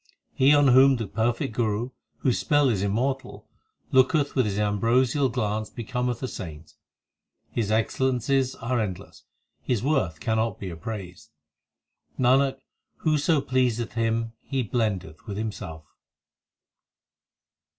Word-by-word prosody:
He 135 +2 +4
on 145 -2 +5
whom 135 +2 +7
the 115 -3 -3
perfect 115 +6 -1
Guru, 115 +2 -1 0.3
whose 125 - +1
spell 145 -2 +3
is 105 -6 0
immortal, 125 +7 -2 0.4
Looketh 140 +2 +3
with 130 -5 +2
his 100 -1 -2
ambrosial 120 +6 +2
glance 110 -3 -2
becometh 125 +1 -3
a - - 0
saint. 85 -9 -8 0.8
His 110 -4 -1
excellences 130 +3 +1
are 120 +2 -1
endless; 95 -5 -5 0.4
his 120 -3 -1
worth 130 - 0
cannot 110 +4 0
be 95 -2 -5
appraised. 90 +1 -7 0.9
Nanak, 135 +2 +3 0.4
whoso 155 -1 +2
pleaseth 125 -3 0
him 115 0 -1
he 135 -2 -2
blendeth 100 -8 -2
with 100 -1 -5
himself. 100 -7 -5
120 Hz, 120 wpm, -26 LUFS, 105-130 Hz, 0.9 s, whom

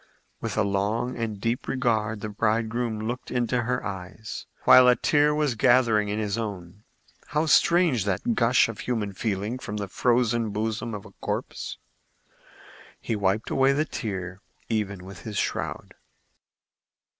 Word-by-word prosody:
With - - -4
a 110 - +4
long 105 +5 -1
and 110 -3 -3
deep 115 +4 -2
regard 110 -5 0
the 110 - -4
bridegroom 110 +1 -1
looked 125 +2 -4
into 125 0 0
her 125 +2 -2
eyes, 95 +2 -7 0.2
while 125 0 +8
a 125 - +6
tear 150 +2 +3
was 150 -4 +1
gathering 115 -3 +3
in 105 - -1
his 105 0 -1
own. 100 -3 -6 0.5
How 150 +1 0
strange 160 - +4
that 100 +4 0
gush 120 +1 +4
of 115 -2 -7
human 110 -5 -2
feeling 105 +4 -2
from 105 -4 -5
the 100 -1 -3
frozen 120 +1 +1
bosom 110 +2 -2
of 100 - -8
a - - -12
corpse! - - -4 1.2
He 115 - -2
wiped 100 +1 0
away 135 +1 +4
the 150 +3 +1
tear, 95 - -5 0.3
even 100 -4 -2
with 95 -1 -10
his 105 -2 -6
shroud. - - -3
110 Hz, 150 wpm, -26 LUFS, 105-125 Hz, 1.2 s, while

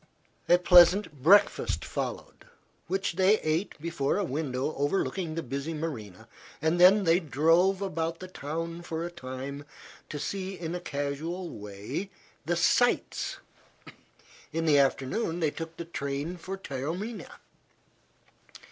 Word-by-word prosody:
A 175 - +7
pleasant 180 +2 +6
breakfast 195 +9 +4
followed, - - -5 0.4
which 190 0 -1
they 195 +3 +5
ate 155 +4 -1
before 160 -2 -1
a 205 - +1
window 145 -3 -2
overlooking 160 +3 -1
the 165 - -3
busy 140 +5 -4
marina, 115 - -6 0.3
and 160 +3 +1
then 195 +3 +7
they 170 0 +4
drove 170 +5 +3
about 165 -3 -2
the 185 - -7
town 165 0 -5
for 165 -1 -4
a 175 - -5
time 140 -2 -7 0.5
to 150 - -5
see 190 +5 -4
in 165 -1 -4
a 180 - -3
casual 160 +4 -4
way 105 - -6 0.4
the 175 - +2
"sights." 245 +8 +1 1.1
In 165 +1 -1
the 150 -3 +5
afternoon 140 - 0
they 155 -3 +1
took 165 +1 -7
the 170 - -5
train 140 +1 -4
for 185 +3 -6
Taormina. 180 - -5
165 Hz, 130 wpm, -28 LUFS, 145-180 Hz, 1.1 s, A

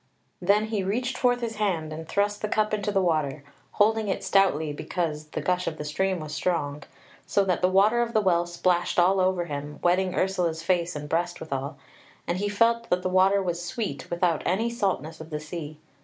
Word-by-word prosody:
Then 200 +4 +3
he 210 -3 -1
reached 245 +7 -1
forth 245 -1 +2
his 225 -2 -3
hand 170 -7 -1
and 160 +1 -8
thrust 205 +1 0
the 215 - -1
cup 215 0 +1
into 205 -1 0
the 195 -2 +2
water, 155 -4 0 0.3
holding 220 +1 +2
it 190 - -2
stoutly 160 -6 +2
because 155 -1 -3
the - - -4
gush 180 0 0
of 155 - -3
the 150 - -5
stream 185 +5 0
was 155 -1 -6
strong, 145 -2 -1 0.5
so 200 - +2
that 180 -3 0
the 180 - +4
water 205 +5 +4
of 235 -1 -1
the 220 - +4
Well 175 -3 +2
splashed 175 0 0
all 185 +2 +4
over 185 -1 +1
him, 145 -1 -6
wetting 185 +1 +2
Ursula's 175 -4 0
face 175 -1 0
and 150 0 -5
breast 175 +3 -1
withal: 140 -1 -4 0.5
and 175 +1 -1
he 205 +1 -1
felt 230 +3 +2
that 180 0 +1
the 185 - 0
water 190 +2 +4
was 175 -1 -2
sweet 175 - -4
without 170 -2 +1
any 220 +6 0
saltness 180 - -2
of 160 - -10
the 150 -2 -3
sea. 155 -1 -7
180 Hz, 205 wpm, -26 LUFS, 160-200 Hz, 0.5 s, the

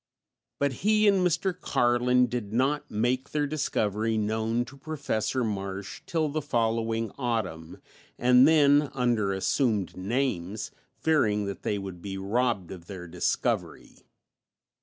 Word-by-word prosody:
But 140 -1 0
he 215 +1 +4
and 200 -1 +5
Mr. 180 +2 +1
Carlin 125 -1 +2
did 120 -4 -4
not 135 +6 0
make 120 +5 0
their 150 -1 0
discovery 110 -7 -1
known 110 +2 0
to 135 - -13
Professor 135 -4 -2
Marsh 100 -2 -4
till 160 -2 0
the 155 +1 -2
following 115 -4 0
autumn, 110 -10 -3 0.4
and 125 +2 +6
then 145 -2 +5
under 120 -6 +1
assumed 100 - 0
names, 100 -1 -2 0.3
fearing 110 -10 +2
that 100 -1 -5
they 105 - -1
would 95 -3 -7
be 95 0 -5
robbed 100 -1 -1
of 90 -3 -10
their 90 -3 -8
discovery. 85 +1 -2
115 Hz, 130 wpm, -27 LUFS, 100-140 Hz, 0.4 s, and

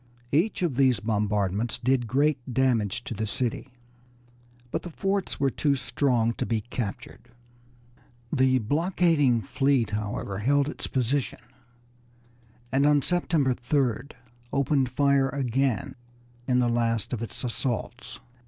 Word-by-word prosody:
Each 180 +6 +1
of 150 -8 -1
these 130 -5 +4
bombardments 105 0 0
did 125 0 +1
great 140 +4 +2
damage 120 -4 +1
to - - -5
the 110 0 -3
city, 125 +4 -2 1.0
but - - -1
the 175 - -7
forts 195 +3 -2
were 135 -1 +2
too 145 +1 +1
strong 120 -2 +1
to - - 0
be 115 -2 0
captured. 120 +1 -6 1.0
The 130 -2 +4
blockading 145 - +2
fleet, 130 0 +1
however, 105 -2 -3
held 140 +5 +2
its 150 - -5
position, 130 +1 -1 1.3
and 135 +2 +2
on 145 -1 +4
September 165 -7 +1
3d 125 0 -1 0.4
opened 140 -1 +1
fire 140 +1 +2
again 135 -2 -1 0.5
in 125 - +2
the 125 -1 +3
last 115 -1 0
of 115 - -2
its 115 - -6
assaults. 120 -1 -4
130 Hz, 125 wpm, -26 LUFS, 115-140 Hz, 1.3 s, these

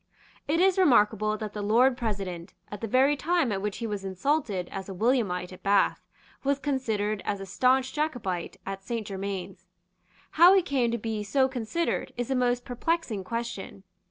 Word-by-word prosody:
It 315 +3 +1
is 380 +1 +4
remarkable 215 - +3
that 215 -1 -6
the 210 - -4
Lord 240 +5 +4
President, 195 -7 -4 0.2
at 205 - -7
the 225 - -2
very 265 +6 +4
time 330 -4 +1
at 195 -1 -2
which 205 0 -3
he 230 - -4
was 205 -3 -4
insulted 195 - -1
as 195 0 -6
a - - -5
Williamite 195 -5 0
at 185 - -13
Bath, 200 0 +2 0.4
was 280 0 +2
considered 220 -7 -1
as 200 - -2
a 195 - -6
stanch 255 +7 +2
Jacobite 245 - -2
at 195 0 -5
Saint 230 +2 -4
Germains. 195 -1 -5 0.6
How 350 +4 +7
he 380 - +4
came 265 -8 +1
to 235 - -1
be 220 -1 -3
so 260 +6 +2
considered 260 +6 -2
is 245 +2 -3
a - - +2
most 245 -1 +1
perplexing 245 - -2
question. 230 -2 -5
225 Hz, 180 wpm, -27 LUFS, 200-265 Hz, 0.6 s, How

